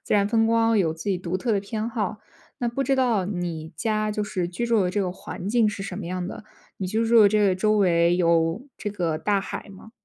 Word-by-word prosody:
自 -, -, -1 dB
然 200 Hz, -1 st, +3 dB
风 225 Hz, +1 st, +2 dB
光 225 Hz, 0 st, +3 dB
有 165 Hz, -5 st, +1 dB
自 160 Hz, -, -10 dB
己 185 Hz, -, 0 dB
独 180 Hz, 0 st, -3 dB
特 225 Hz, +5 st, -1 dB
的 200 Hz, -, +1 dB
偏 215 Hz, +2 st, -4 dB
好。 215 Hz, -3 st, -3 dB, 0.4 s
那 240 Hz, -, 0 dB
不 235 Hz, +4 st, -2 dB
知 270 Hz, -, +2 dB
道 235 Hz, -8 st, +2 dB
你 175 Hz, -5 st, -4 dB
家 215 Hz, -2 st, 0 dB
就 210 Hz, 0 st, -2 dB
是 185 Hz, -4 st, -2 dB
居 180 Hz, +7 st, -3 dB
住 230 Hz, -3 st, +2 dB
的 -, -, +1 dB
这 205 Hz, +2 st, -1 dB
个 185 Hz, -, -1 dB
环 180 Hz, 0 st, -8 dB
境 225 Hz, 0 st, +3 dB
是 205 Hz, -1 st, -5 dB
什 195 Hz, -, -5 dB
么 190 Hz, -, -6 dB
样 180 Hz, 0 st, -3 dB
的， 205 Hz, -, -8 dB, 0.3 s
你 190 Hz, -, -2 dB
居 220 Hz, +5 st, 0 dB
住 230 Hz, 0 st, +6 dB
的 205 Hz, -, +7 dB
这 215 Hz, +1 st, +2 dB
个 190 Hz, -2 st, +3 dB
周 215 Hz, +3 st, +2 dB
围 175 Hz, -3 st, +3 dB
有 170 Hz, +3 st, +2 dB, 0.2 s
这 210 Hz, -, -3 dB
个 170 Hz, -6 st, -2 dB
大 205 Hz, +4 st, +1 dB
海 195 Hz, -, -7 dB
吗？ 200 Hz, +3 st, -14 dB
205 Hz, 275 characters per minute, -24 LUFS, 180-220 Hz, 0.4 s, 的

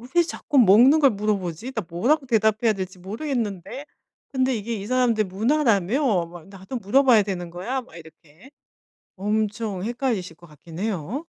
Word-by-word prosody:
'왜 345 Hz, -, +6 dB
자꾸 295 Hz, -3 st, -3 dB
먹는 245 Hz, +8 st, +6 dB
걸 275 Hz, -3 st, +6 dB
물어보지? 205 Hz, +1 st, -3 dB
나 220 Hz, -, -3 dB
뭐라고 265 Hz, -, +1 dB
대답해야 220 Hz, -1 st, +2 dB
될지 185 Hz, -1 st, -6 dB
모르겠는데. 220 Hz, -, -4 dB, 0.5 s
근데 260 Hz, -1 st, +1 dB
이게 225 Hz, +2 st, -4 dB
이 200 Hz, -1 st, -6 dB
사람들 240 Hz, -3 st, +1 dB
문화라며? 220 Hz, -, +1 dB
막 175 Hz, 0 st, -13 dB
나도 195 Hz, +6 st, -7 dB
물어봐야 235 Hz, +1 st, +4 dB
되는 180 Hz, -4 st, -5 dB
거야?' 230 Hz, +10 st, -4 dB
막 205 Hz, -, -18 dB
이렇게. 160 Hz, -, -17 dB, 0.6 s
엄청 210 Hz, -1 st, -2 dB
헷갈리실 230 Hz, -, -2 dB
것 175 Hz, -, -16 dB
같긴 160 Hz, +3 st, -12 dB
해요. 215 Hz, -, -3 dB
215 Hz, 330 characters per minute, -23 LUFS, 185-255 Hz, 0.6 s, 왜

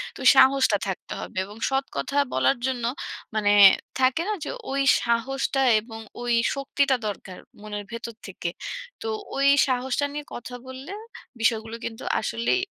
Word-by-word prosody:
তো -, -, -11 dB, 0.2 s
সাহসটা 265 Hz, -5 st, +5 dB
থাকতে 190 Hz, -, -5 dB
হবে। -, -, -8 dB
এবং 205 Hz, +2 st, -12 dB
সৎ 270 Hz, 0 st, 0 dB
কথা 280 Hz, -, -3 dB, 0.2 s
বলার 130 Hz, -, +2 dB
জন্য 250 Hz, -2 st, -2 dB, 0.5 s
মানে 205 Hz, -1 st, +3 dB, 0.5 s
থাকে 260 Hz, +5 st, +3 dB
না -, -, +1 dB
যে, -, -, -5 dB, 0.2 s
ওই 275 Hz, 0 st, +1 dB, 0.2 s
সাহসটা 265 Hz, +3 st, 0 dB, 0.2 s
এবং 225 Hz, 0 st, -10 dB, 0.2 s
ওই 240 Hz, 0 st, 0 dB, 0.2 s
শক্তিটা 275 Hz, 0 st, +1 dB
দরকার 195 Hz, -2 st, -6 dB, 0.2 s
মনের 210 Hz, -1 st, -5 dB
ভেতর 230 Hz, 0 st, -6 dB
থেকে। 180 Hz, -2 st, -4 dB, 0.5 s
তো 450 Hz, -, -4 dB, 0.3 s
ওই 275 Hz, 0 st, +3 dB, 0.2 s
সাহসটা 260 Hz, +2 st, 0 dB
নিয়ে 295 Hz, 0 st, -5 dB
কথা 245 Hz, +1 st, -7 dB
বললে, 260 Hz, +6 st, -8 dB, 0.5 s
বিষয়গুলো 225 Hz, -1 st, +1 dB
কিন্তু 225 Hz, -1 st, -6 dB, 0.2 s
আসলেই 230 Hz, +11 st, 0 dB
245 Hz, 145 wpm, -25 LUFS, 220-270 Hz, 0.5 s, সাহসটা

